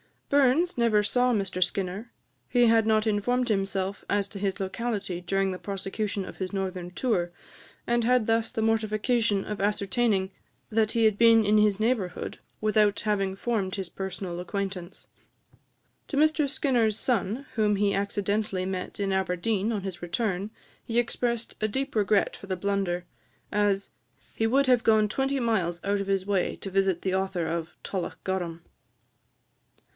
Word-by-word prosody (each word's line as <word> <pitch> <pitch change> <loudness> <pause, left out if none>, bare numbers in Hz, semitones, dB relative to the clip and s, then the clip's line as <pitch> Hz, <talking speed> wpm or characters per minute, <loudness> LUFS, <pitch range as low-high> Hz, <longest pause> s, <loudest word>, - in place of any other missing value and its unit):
Burns 285 +5 +3
never 220 -3 +4
saw 250 +4 +2
Mr 195 -4 -2
Skinner; 195 +5 -3 0.4
he 245 -1 +4
had 225 -1 +4
not 215 0 +3
informed 240 +4 +1
himself 195 -1 -1
as 200 -1 +1
to 200 - -7
his 195 0 -1
locality 195 -2 -3
during 195 +1 0
the 185 - -5
prosecution 200 0 -3
of - - -10
his 185 0 -4
northern 185 -2 -3
tour, 180 -3 0 0.5
and 235 0 +1
had 250 -2 +3
thus 225 0 +1
the 230 - -2
mortification 220 -1 +1
of 210 -1 -5
ascertaining 200 -1 +1 0.4
that 220 -1 +1
he 230 - +2
had 215 -2 +4
been 230 -1 +6
in 210 +1 +4
his 210 -1 +3
neighbourhood, 215 -6 -1 0.2
without 215 -1 +3
having 195 -3 0
formed 195 -3 -1
his 190 -3 -4
personal 190 -2 -5
acquaintance. 190 -1 -5 1.0
To 280 - -3
Mr 305 -1 +3
Skinner's 245 -6 +1
son, 235 +2 -1
whom 210 -2 +2
he 200 0 +2
accidentally 200 -1 -1
met 185 +1 -4
in 195 -1 0
Aberdeen 190 +3 0
on 210 -3 -1
his 185 -3 -5
return, 190 +2 -2 0.3
he 230 - -3
expressed 235 0 -1
a 215 - +2
deep 265 +6 -3
regret 210 -1 +2
for 195 - -11
the 185 -1 -2
blunder, 190 -2 -1 0.5
as 205 -1 +1 0.4
"he 225 - +1
would 275 +4 +3
have 250 -2 +4
gone 215 -1 +4
twenty 270 +4 0
miles 190 -8 0
out 200 0 0
of 195 - -5
his 195 -1 0
way 195 -2 0
to 195 - -7
visit 190 -2 +1
the 190 - 0
author 190 -2 -1
of 165 0 -2
'Tullochgorum.'" 180 -2 -3
205 Hz, 160 wpm, -27 LUFS, 190-225 Hz, 1.0 s, been